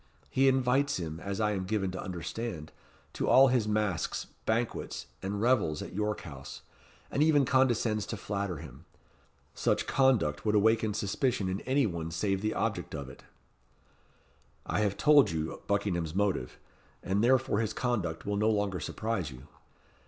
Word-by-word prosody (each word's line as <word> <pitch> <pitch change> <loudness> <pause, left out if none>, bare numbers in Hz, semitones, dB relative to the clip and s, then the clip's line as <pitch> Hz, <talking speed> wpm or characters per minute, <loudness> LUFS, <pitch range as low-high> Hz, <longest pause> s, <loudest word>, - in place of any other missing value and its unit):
He 135 +1 +3
invites 135 +2 +2
him, 80 -2 -5
as 100 +3 -4
I 105 -1 +2
am 95 -2 -2
given 95 -1 -1
to 95 - -5
understand, 90 -1 -5 0.4
to - - -2
all 135 +1 +7
his 120 -4 +1
masques, 105 -4 -1 0.2
banquets, 115 +1 -1 0.2
and 100 +1 -3
revels 110 -10 +2
at - - -9
York 105 +2 -1
House, 70 -5 -9 0.5
and 140 - 0
even 150 -3 +4
condescends 120 -5 +2
to 115 - -4
flatter 100 -3 -3
him. 75 0 -11 0.7
Such - - 0
conduct 125 - +2
would 105 -1 +1
awaken 110 0 +3
suspicion 105 0 0
in 95 +2 -3
any 135 +1 +3
one 85 -5 -3
save 95 +4 -1
the 110 +1 -1
object - - -2
of 70 -2 -6
it." 65 - -14 1.4
"I - - -1
have 105 -2 0
told 150 -2 +6
you 80 -1 -3
Buckingham's 90 -5 -1
motive, 95 -11 0 0.5
and 100 +3 0
therefore 130 -3 +3
his 110 -2 0
conduct 105 -10 -2
will 100 0 -1
no 105 +2 +3
longer 100 -4 0
surprise 110 -8 -3
you. 65 -2 -12
105 Hz, 160 wpm, -30 LUFS, 90-120 Hz, 1.4 s, all